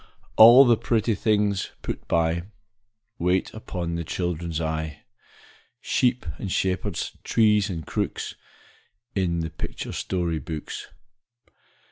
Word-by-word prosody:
All 120 +5 +10
the 120 -2 +5
pretty 115 0 +1
things 105 -3 0
put - - -5
by, 85 +1 +1 0.7
Wait 90 +2 +1
upon 90 -6 -4
the 85 0 -2
children's 85 -1 -3
eye, 80 -2 -3 0.8
Sheep 125 -3 +1
and 95 - -4
shepherds, 95 0 -1
trees 105 -2 +3
and 80 -5 -5
crooks, - - -3 0.8
In 85 -3 0
the 80 -1 -4
picture 80 - -6
story 85 -4 -2
books. 75 +2 -6
90 Hz, 110 wpm, -25 LUFS, 85-105 Hz, 0.8 s, All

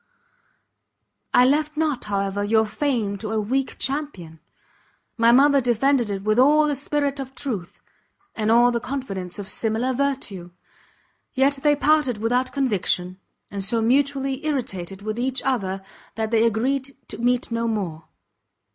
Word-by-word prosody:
I 250 - +6
left 300 +3 +1
not, 305 -5 0
however, 200 -1 -1
your 220 +1 +3
fame 215 -4 -1
to 215 +1 -5
a 220 0 0
weak 260 +6 -1
champion: 265 - -4 0.8
my 230 0 +4
mother 280 +2 +5
defended 245 0 +2
it 195 -1 -4
with 215 +3 +2
all 300 +4 +5
the 295 - 0
spirit 285 0 -1
of 265 0 -7
truth, 225 -11 -5 0.5
and 215 -1 -1
all 240 +2 +5
the 235 - -1
confidence 200 -9 -5
of 200 -2 -6
similar 225 +5 0
virtue! 250 -10 -2 0.9
yet 270 +1 +2
they 295 0 +4
parted 290 -5 +2
without 245 +4 0
conviction, 190 -8 -1 0.3
and 200 -1 -4
so 225 +4 +1
mutually 270 +3 +1
irritated 195 - -3
with 215 +2 -3
each 260 +1 0
other, 195 -7 -1 0.3
that 220 0 -2
they 225 0 +4
agreed 265 +5 -1
to - - -6
meet 245 0 0
no 230 0 -1
more. 180 -8 -3
240 Hz, 145 wpm, -23 LUFS, 210-275 Hz, 0.9 s, I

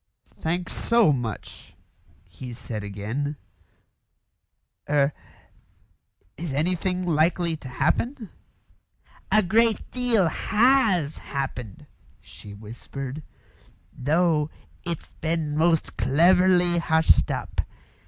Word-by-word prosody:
"Thanks 175 +2 -2
so 230 -8 +3
much," 120 -7 -5 0.5
he 125 -2 -9
said 115 -3 -6
again. 110 +9 -3 1.5
"Er 145 -1 +3 1.2
is 160 -2 -4
anything 180 +4 0
likely 170 +1 +2
to 140 - -10
happen?" 230 - -1 1.0
"A 215 0 +5
great 225 +5 +2
deal 240 -7 +2
has 210 - +2
happened," 135 -3 -5 0.3
she 105 - -13
whispered, 125 +7 -7 0.7
"though 155 +2 +2 0.3
it's 170 -3 -5
been 160 -2 -1
most 165 0 +1
cleverly 175 - +4
hushed 160 -1 +3
up. - - -2
160 Hz, 85 wpm, -25 LUFS, 135-180 Hz, 1.5 s, A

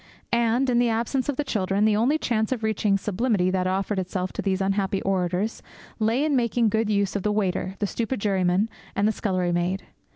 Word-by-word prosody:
And, 235 +3 +2
in 245 -1 +3
the 240 -1 +3
absence 235 +5 -1
of 290 - 0
the 295 - -1
children, 200 -5 0
the 215 -1 +3
only 245 +8 +2
chance 220 -6 -1
of 240 -4 -2
reaching 210 -2 +1
sublimity 200 -2 0
that 185 -1 0
offered 190 +2 -1
itself 185 0 -3
to - - -3
these 190 -1 0
unhappy 195 0 0
orators 190 +2 -1 0.4
lay 230 +6 +2
in 300 -2 +1
making 235 -2 +2
good 220 +1 0
use 200 -2 +1
of 200 - 0
the 210 - 0
waiter, 190 -2 -1
the 205 - -1
stupid 230 +4 -2
juryman, 195 0 +1 0.3
and 205 - +2
the - - +3
scullery 185 -4 -1
maid. 175 +3 -1
210 Hz, 205 wpm, -25 LUFS, 190-230 Hz, 0.4 s, in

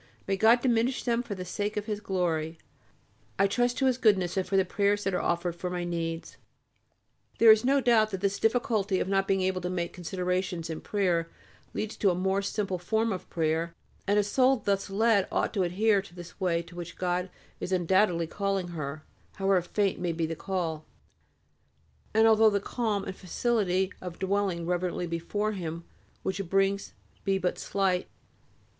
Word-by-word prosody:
May 195 - +1
God 225 +5 +5
diminish 245 +1 +1
them 235 -1 +1
for 225 -4 -5
the 185 -1 -6
sake 205 +4 -3
of 210 - -2
His 210 -2 -3
glory. 170 -5 -1 0.8
I 195 - +4
trust 245 +4 +1
to 270 - +1
His 255 -1 +2
Goodness 190 -6 +3
and 190 - +1
to 195 - +1
the 190 - +4
prayers 205 +2 +1
that 195 - -1
are 180 - 0
offered 170 0 -1
for 180 +1 -4
my 180 -1 -3
needs.... 165 -1 -4 1.0
There 225 -1 +8
is 220 +1 +5
no 275 +2 +3
doubt 225 -3 +4
that 190 -3 -4
this 200 0 0
difficulty 220 -5 +1
of - - -1
not 195 0 +1
being 195 -1 +2
able 185 0 0
to 180 - -3
make 175 -2 -2
considerations 180 -1 -2
in 160 - -5
prayer 175 -5 0 0.5
leads 215 0 -3
to 200 - +3
a 180 - +1
more 190 +2 +1
simple 195 -2 -2
form 220 +4 0
of 185 - -7
prayer, 165 +1 -1 0.3
and 205 +1 +3
a 210 - +4
soul 255 +6 +3
thus 200 -4 -1
led 205 0 +3
ought - - 0
to 200 - 0
adhere 200 +3 +2
to 190 -2 -15
this 175 +2 -11
way 170 -3 +1
to 170 +1 -14
which 175 -1 -7
God 180 0 -1 0.3
is - - -4
undoubtedly 180 -1 +2
calling 195 +1 -2
her, 155 -2 -5 0.3
however 195 -1 +2
faint 195 +2 0
may 175 -1 -1
be 165 0 -1
the 165 +1 -3
call, 165 -4 -3 1.3
and 220 0 +4
although 220 0 +6
the 200 -1 +1
calm 210 -1 -2
and 190 - -6
facility 190 -1 0
of 180 -2 -7
dwelling 190 -3 0
reverently 180 0 -1
before 175 +6 -2
Him 170 -4 -5 0.4
which 190 - -2
it 195 - -2
brings 195 +2 0 0.3
be 195 -1 +1
but 180 -1 -1
slight. 190 -2 0
190 Hz, 190 wpm, -28 LUFS, 175-210 Hz, 1.3 s, There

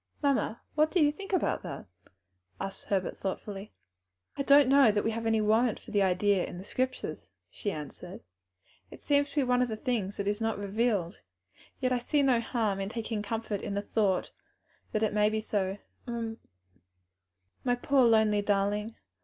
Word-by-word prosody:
"Mamma, 275 -5 +1
what 305 +1 +3
do 360 - +1
you 295 -2 +5
think 390 +7 -9
about 370 - 0
it?" 140 - -6 0.7
asked 195 0 -6
Herbert. 190 -2 -1
"I 195 +1 -4 0.7
do - - -17
not 290 -3 +5
know 270 -4 +6
that 205 0 0
we 225 - +1
have 225 0 -3
any 225 -1 +2
warrant 220 +2 +2
for - - -13
the 205 - +2
idea 190 +1 +2
in 175 - -6
the 185 - -7
Scriptures," 255 +5 -3 0.2
she 205 - -3
answered; 155 +3 -8 0.7
"it - - -12
seems 285 0 +2
to - - -14
be 290 - +3
one 250 0 +2
of 250 - +2
the 220 -2 -4
things 215 -5 -2
that 200 - -2
is 205 +2 -1
not 225 -1 0
revealed; 205 -3 -1 0.6
yet 255 -1 0
I 250 - +2
see 285 +4 +1
no 255 -3 +4
harm 220 -5 -1
in 195 0 -2
taking 225 -1 -3
comfort 215 -1 -3
in 200 -2 -4
the 200 - -1
thought 200 -3 0 0.6
that 215 - 0
it 215 - +1
may 210 0 +3
be 220 0 -1
so. 200 -3 -1 1.9
My 245 -1 +2
poor 270 +2 +3
lonely 220 -2 +4
darling! 205 +2 0
220 Hz, 180 wpm, -29 LUFS, 200-245 Hz, 1.9 s, know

